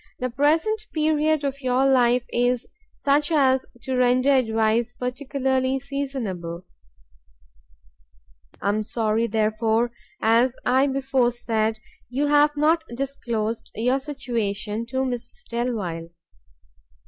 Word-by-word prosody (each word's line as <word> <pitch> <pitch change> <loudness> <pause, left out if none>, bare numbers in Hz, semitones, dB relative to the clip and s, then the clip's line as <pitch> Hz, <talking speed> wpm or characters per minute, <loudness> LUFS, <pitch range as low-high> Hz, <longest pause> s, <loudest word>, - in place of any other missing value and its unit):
The 255 -1 -3
present 325 - +1
period 310 -1 +2
of 275 0 -3
your 255 0 +2
life 250 -2 +4
is 245 +1 +1 0.3
such 290 +2 +1
as 265 -4 +3 0.2
to 260 - -2
render 250 +2 +3
advice 225 -2 +2
particularly 260 +1 -1
seasonable; 235 -12 -4 2.0
I - - +2
am 215 +1 0
sorry, 220 +1 0
therefore, 220 +2 +1 0.3
as 235 +3 +3
I 260 +3 +3
before 265 -2 +1
said, 225 -2 -1 0.3
you 270 +4 0
have 295 0 +4
not 320 +3 +3
disclosed 235 -4 -3
your 250 +5 +1
situation 230 -6 -3
to 260 +2 -1
Mrs 250 - -5
Delvile. 210 -9 -3
250 Hz, 110 wpm, -24 LUFS, 225-275 Hz, 2.0 s, life